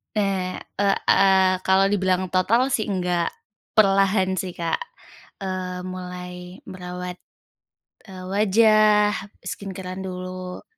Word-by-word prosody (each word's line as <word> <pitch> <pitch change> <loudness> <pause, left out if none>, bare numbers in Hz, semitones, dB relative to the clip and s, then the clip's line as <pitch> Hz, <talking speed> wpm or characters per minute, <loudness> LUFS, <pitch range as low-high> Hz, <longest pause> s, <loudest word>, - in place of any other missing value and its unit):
Eee, 195 -3 0 0.2
ek 200 -1 +3
aaa, 190 -1 +5
kalau 190 +1 +4
dibilang 185 -2 +1
total 230 +8 +2
sih 220 -4 0
enggak. 180 -3 0 0.5
Perlahan 195 -2 +4
sih, 185 -2 -4
Kak, 170 - -1 0.6
eee, 185 -1 -4
mulai 180 0 -7
merawat, 180 0 -7 0.9
eee, 185 -1 -9
wajah, 210 +1 +4 0.3
skincare-an 185 0 -6
dulu. 185 0 -6
185 Hz, 100 wpm, -23 LUFS, 180-195 Hz, 0.9 s, aaa